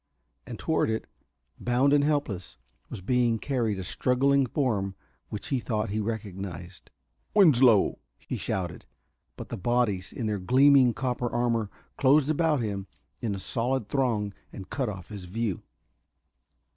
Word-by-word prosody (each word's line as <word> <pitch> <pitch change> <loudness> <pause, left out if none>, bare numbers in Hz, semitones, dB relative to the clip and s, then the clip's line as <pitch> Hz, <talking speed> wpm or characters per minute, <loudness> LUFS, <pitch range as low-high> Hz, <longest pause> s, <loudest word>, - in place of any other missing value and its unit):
And - - -6
toward - - 0
it, 110 0 -2 0.5
bound 125 +4 +2
and 145 -1 +4
helpless, 140 - -1 0.3
was - - -7
being 120 +2 +2
carried 115 -5 -1
a 95 - -4
struggling 135 +7 +2
form 105 -9 -1 0.3
which 105 - -6
he 135 - +1
thought 110 -3 -2
he 110 - -1
recognized. 95 -5 -6 0.5
"Winslow!" 130 - +5 0.2
he - - -6
shouted. 90 -5 -4 0.5
But - - -8
the - - -4
bodies 105 -3 0
in 120 - -4
their 105 -2 -1
gleaming 130 +3 +5
copper 125 -2 -1
armor 115 -3 0 0.3
closed 145 +2 +4
about 155 -3 +2
him 100 -3 -3 0.3
in 110 -4 -1
a - - -6
solid 115 +2 -1
throng 115 -7 0 0.2
and 95 - -10
cut 130 -5 -1
off 95 -3 -8
his 100 -4 -8
view. 105 0 -2
115 Hz, 145 wpm, -27 LUFS, 100-130 Hz, 0.5 s, Winslow